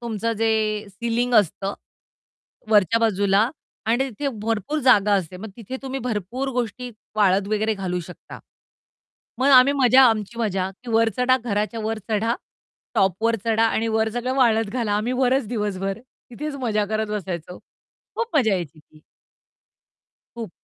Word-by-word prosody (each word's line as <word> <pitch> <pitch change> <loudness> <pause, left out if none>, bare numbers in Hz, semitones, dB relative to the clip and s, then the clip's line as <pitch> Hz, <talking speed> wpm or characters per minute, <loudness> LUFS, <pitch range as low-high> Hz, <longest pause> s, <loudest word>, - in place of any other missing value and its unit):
तुमचं 230 -1 -2
जे 215 -1 0
सिलिंग 235 +4 -2
असतं, 200 -1 +2 1.0
वरच्या 210 +1 +4
बाजूला 200 -3 +2 0.5
आणि 240 +4 +1
तिथे 280 +6 -3
भरपूर 225 +7 -1
जागा 210 -6 +4
असते. 185 -2 -2
मग 210 +3 -8
तिथे 240 +3 -7
तुम्ही 270 0 -4
भरपूर 240 +3 -3
गोष्टी 245 +1 -3 0.3
वाळत 200 -1 +3
वगैरे 215 +1 +1
घालू 180 -3 -3
शकता. 175 +1 -11 1.0
मग 265 +2 +2
आम्ही 260 +2 +7
मजा 255 +1 +7
आमची 225 -1 +1
मजा 195 -4 -1
की 245 - -7
वर 225 0 +3
चढा, 250 +1 +3
घराच्या 215 0 -1
वर 220 +1 -2
चढा 220 +2 +1 0.6
टॉपवर 195 +5 +2
चढा 225 0 +2
आणि 225 0 0
वर 220 0 +1
सगळं 245 +3 -2
वाळत 225 -5 +3
घाला. 230 -4 -1
आम्ही 215 +4 0
वरच 260 0 +1
दिवसभर 200 -3 -2
तिथेच 260 +4 -9
मजा 215 -3 +1
करत 215 +1 -1
बसायचो. 180 -4 -5 0.6
खूप 465 -7 -2
मजा 230 -7 +3
यायची 165 -4 -5
ती. 155 0 -23 1.3
खूप. 230 -5 -6
220 Hz, 145 wpm, -23 LUFS, 205-245 Hz, 1.3 s, आम्ही